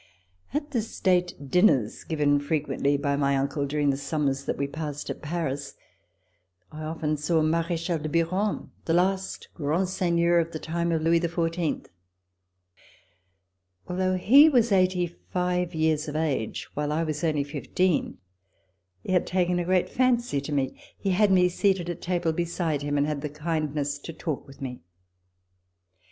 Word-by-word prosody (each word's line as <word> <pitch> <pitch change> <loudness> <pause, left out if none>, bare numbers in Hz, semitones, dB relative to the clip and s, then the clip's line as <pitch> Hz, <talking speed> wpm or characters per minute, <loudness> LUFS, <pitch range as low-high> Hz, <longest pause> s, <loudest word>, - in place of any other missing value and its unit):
At 295 +2 -3
the 240 -5 +1
State 180 -9 -1
dinners 180 - +3
given 145 -3 +2
frequently 145 -1 0
by 140 0 0
my 140 -1 +2
uncle 140 +1 -1
during 145 0 +1
the 135 - -2
summers 140 -1 -1
that - - -2
we 140 - 0
passed 150 0 -5
at - - -7
Paris, 150 -3 -3 1.0
I 155 - -8
often 155 -1 -2
saw 160 +2 +1
Marechal 165 +1 0
de 155 +1 -4
Biron, 185 +6 0
the 165 - +1
last 190 +2 0
grand 165 +4 0
seigneur 170 -2 +2
of 165 0 -2
the - - -2
time 170 +2 -2
of 160 -1 0
Louis 165 +1 +4
XIV. 165 -1 -1 2.0
Although 185 +1 0
he 275 - +7
was 240 -6 +3
eighty 185 -2 +3
five 180 0 -2
years 155 0 +1
of 150 - -5
age, 150 -8 -1
while 150 0 -2
I 160 +2 +1
was 155 0 -3
only 150 -3 +1
fifteen, 155 +4 -1 0.9
he - - -4
had 180 -2 +2
taken 180 -1 +1
a 175 - -1
great 185 0 +2
fancy 240 - +1
to 140 - -6
me. 135 -2 -1 0.2
He 195 - -1
had 200 +2 +3
me 180 -1 +5
seated 180 -1 +1
at 175 - -8
table 175 -2 0
beside 165 -3 -1
him, 145 0 -1
and 145 - +3
had 150 -1 -2
the 150 - -3
kindness 150 -2 -2
to 165 - -8
talk 155 -2 -4
with 135 0 -15
me. 125 -2 -6
165 Hz, 160 wpm, -26 LUFS, 145-180 Hz, 2.0 s, he